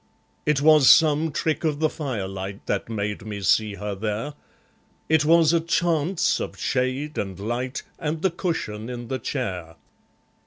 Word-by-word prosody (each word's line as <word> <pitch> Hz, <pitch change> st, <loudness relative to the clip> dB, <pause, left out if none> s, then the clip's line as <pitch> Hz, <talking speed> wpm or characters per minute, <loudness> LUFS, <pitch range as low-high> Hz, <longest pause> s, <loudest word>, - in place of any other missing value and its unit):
It 150 Hz, -2 st, +2 dB
was 150 Hz, -3 st, +6 dB
some 155 Hz, 0 st, +5 dB
trick 155 Hz, +3 st, -1 dB
of 150 Hz, -2 st, 0 dB
the 155 Hz, -, +3 dB
firelight 100 Hz, -, -5 dB
That -, -, -2 dB
made 105 Hz, -2 st, -3 dB
me 105 Hz, -2 st, -6 dB
see 105 Hz, +1 st, +2 dB
her 105 Hz, +1 st, -4 dB
there. 110 Hz, +8 st, -3 dB, 0.7 s
It 160 Hz, -1 st, +3 dB
was 165 Hz, 0 st, +5 dB
a 170 Hz, -, +4 dB
chance 170 Hz, +1 st, +1 dB
of -, -, -5 dB
shade 130 Hz, +4 st, -1 dB
and 95 Hz, -2 st, -4 dB
light 120 Hz, +5 st, -3 dB, 0.2 s
And 155 Hz, +1 st, -3 dB
the 190 Hz, -, +3 dB
cushion 125 Hz, -, -3 dB
in 120 Hz, -2 st, -6 dB
the 130 Hz, -, -2 dB
chair. 90 Hz, -, -4 dB
130 Hz, 155 wpm, -24 LUFS, 105-155 Hz, 0.7 s, was